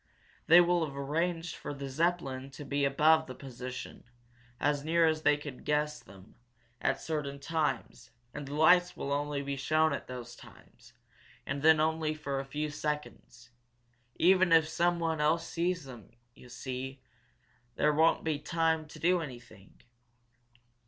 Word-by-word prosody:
They 165 +2 +9
will 175 -1 +2
have 140 -3 -5
arranged 165 +5 -2
for 145 - -6
the 140 0 -6
Zeppelin 135 -3 -1
to 145 - -9
be 140 0 0
above 155 +3 +4
the 130 - -8
position, 130 -1 -8 0.6
as 145 0 0
near 165 +2 +3
as 155 -1 +1
they 145 -1 +4
can 145 -3 -8
guess 150 0 0
them, 95 +1 -16 0.5
at 135 - 0
certain 145 -3 -4
times 140 -6 -2 0.2
and 145 -2 -6
the 145 - -5
lights 175 +3 +4
will 140 - -4
only 145 0 -2
be 140 0 -3
shown 155 +2 +2
at - - -5
those 125 -1 -8
times, - - -17 0.5
and 140 +1 -3
then 160 0 +6
only 155 0 0
for 140 -3 -3
a 135 - -5
few 150 +2 -3
seconds. 150 -5 -5 0.6
Even 185 0 +4
if 160 -1 +6
someone 165 -1 0
else 165 +2 +1
sees 175 0 -1
them, 120 -6 -11 0.2
you 125 - -16
see, 130 +2 -6 0.8
there 150 +5 +2
won't 160 +2 +3
be 155 -2 -1
time 160 -1 0
to 155 - -12
do 175 +3 +2
anything." 120 -9 -11
150 Hz, 155 wpm, -31 LUFS, 135-160 Hz, 0.8 s, They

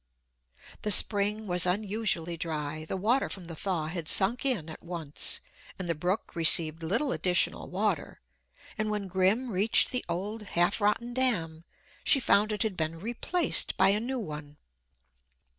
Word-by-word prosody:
The 210 - -2
spring 210 +1 +5
was 180 -2 +5
unusually 195 -3 -1
dry; 155 -2 -5
the 190 - -4
water 230 +8 +1
from 190 - -6
the 165 -1 -8
thaw 170 -2 -2
had 160 0 -6
sunk 205 +10 +1
in 210 - 0
at 160 - -10
once, 165 -4 -5 0.4
and 185 - -6
the 170 - 0
brook 180 +7 -3
received 165 -1 +4
little 200 - -1
additional 180 -5 0
water; 195 -3 -2 0.6
and 215 0 -1
when 210 -2 -3
Grim 190 +7 0
reached 200 +4 +2
the 250 - -3
old, 205 +6 -4
half 195 0 0
rotten 225 +4 0
dam, 170 -11 -1 0.4
she 275 - +4
found 215 -3 +2
it 210 - -1
had 215 -4 -3
been 160 0 -3
replaced 240 - -1
by 190 +1 +5
a 205 +2 +2
new 255 +4 -3
one. 150 -8 -7
190 Hz, 160 wpm, -28 LUFS, 165-215 Hz, 0.6 s, spring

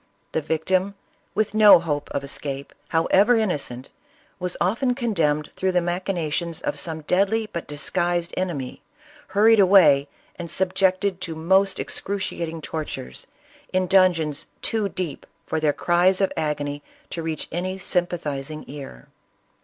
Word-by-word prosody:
The 160 - 0
victim, 185 +6 0 0.4
with 215 -1 0
no 215 -1 +8
hope 150 -4 -3
of 140 - -3
escape, 140 0 -5
however 195 +8 +4
innocent, 145 - -2 0.5
was 180 -1 -2
often 240 +8 +1
condemned 165 - 0
through 190 0 0
the 180 - +4
machinations 170 -2 -2
of - - -3
some 160 -2 -3
deadly 200 +7 +1
but 170 - -4
disguised 175 +3 -1
enemy, 165 -9 -3 0.5
hurried 220 +2 +5
away 170 -8 +6 0.3
and 170 -1 -6
subjected 190 +1 +1
to 165 -2 -4
most 190 +4 +2
excruciating 170 -5 -3
tor 155 +1 -4
tures, 65 - -8 0.5
in 185 0 +1
dungeons 175 -6 +2 0.2
too 220 -3 0
deep 180 -5 -5 0.2
for 160 - -1
their 155 -1 +2
cries 175 +4 +2
of 195 - +1
agony 145 -2 -2 0.3
to 170 - -4
reach 160 -1 -4
any 185 +3 -3
sympathizing 155 -5 -2
ear. 135 - -9
175 Hz, 135 wpm, -23 LUFS, 150-190 Hz, 0.5 s, no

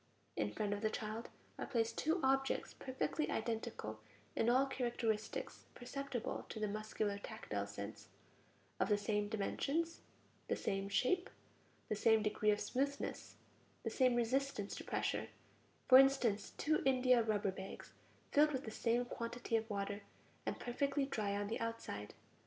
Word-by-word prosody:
In 105 -1 0
front 205 - -1
of 205 - -3
the 220 - +2
child 220 +1 -4 0.3
are - - -3
placed 230 -2 +1
two 320 +4 +1
objects 270 0 +2
perfectly 265 +4 -2
identical 220 - -2 0.4
in 225 - +3
all 260 +3 +5
characteristics 235 -5 -2
perceptible 255 -1 -4
to 220 - -5
the 215 - +1
muscular 210 -1 -2
tactile 105 - -4
sense: 100 +1 -7 0.7
of - - +2
the 210 - +5
same 205 0 0
dimensions, 290 +10 -1 0.5
the - - +1
same 195 0 -1
shape, 355 - +2 0.6
the - - 0
same 220 +1 +4
degree 210 0 +2
of 210 0 +4
smoothness, 280 +2 -2 0.5
the - - -1
same 255 -2 +4
resistance 240 -3 0
to - - -6
pressure; - - -1 0.6
for 260 -1 +11
instance, 240 -7 +3
two 310 +1 +2
india 255 -2 +5
rubber 210 -3 +1
bags, 190 +1 -8 0.4
filled 300 +1 +5
with 260 - -1
the 220 - -4
same 235 +2 +1
quantity 235 0 -3
of 225 0 0
water, 200 0 -2 0.5
and - - -1
perfectly 275 +3 0
dry 210 -7 -1
on 205 0 -1
the 220 - -2
outside. 230 - -4
225 Hz, 150 wpm, -38 LUFS, 205-260 Hz, 0.7 s, for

